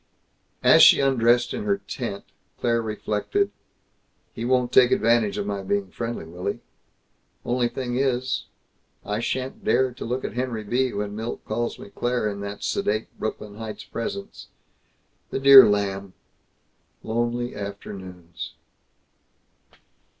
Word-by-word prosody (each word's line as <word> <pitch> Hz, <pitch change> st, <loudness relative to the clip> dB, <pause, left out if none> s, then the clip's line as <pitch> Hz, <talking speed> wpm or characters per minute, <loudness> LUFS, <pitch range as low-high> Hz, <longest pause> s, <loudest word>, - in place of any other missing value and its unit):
As -, -, +7 dB
she -, -, +9 dB
undressed, 120 Hz, -2 st, +3 dB
in 220 Hz, -, -3 dB
her 200 Hz, -1 st, +2 dB
tent, 120 Hz, -, -6 dB, 0.3 s
Claire 115 Hz, -1 st, +1 dB
reflected, 110 Hz, -, -1 dB, 0.8 s
"He 115 Hz, -, -5 dB
won't 125 Hz, -1 st, +2 dB
take 125 Hz, -2 st, +7 dB
advantage 115 Hz, -3 st, +2 dB
of 100 Hz, -, -2 dB
my 100 Hz, -1 st, -3 dB
being 100 Hz, -1 st, -2 dB
friendly, 120 Hz, -7 st, -4 dB
will 90 Hz, +3 st, -7 dB
he? 100 Hz, -, -2 dB, 0.9 s
Only 120 Hz, 0 st, +1 dB
thing 120 Hz, 0 st, -3 dB
is 130 Hz, -1 st, 0 dB, 0.6 s
I 105 Hz, +1 st, -2 dB
sha'n't 130 Hz, -, -3 dB
dare 130 Hz, -, +2 dB
to -, -, -8 dB
look 125 Hz, +3 st, -3 dB
at -, -, -4 dB
Henry 125 Hz, -3 st, -3 dB
B. 125 Hz, +4 st, 0 dB
when 105 Hz, 0 st, -4 dB
Milt 110 Hz, +2 st, -5 dB
calls 115 Hz, +2 st, -2 dB
me 100 Hz, -, -11 dB
'Claire' 120 Hz, -3 st, -1 dB
in 100 Hz, -1 st, -6 dB
that 100 Hz, 0 st, -6 dB
sedate 110 Hz, +2 st, -1 dB
Brooklyn 105 Hz, -1 st, -5 dB
Heights 110 Hz, -1 st, -7 dB
presence. 200 Hz, +12 st, -6 dB, 0.8 s
The -, -, -2 dB
dear 135 Hz, -3 st, +10 dB
lamb! 100 Hz, -2 st, -1 dB, 0.9 s
Lonely 120 Hz, +2 st, -2 dB
afternoons 95 Hz, -4 st, -8 dB
115 Hz, 135 wpm, -24 LUFS, 105-125 Hz, 0.9 s, dear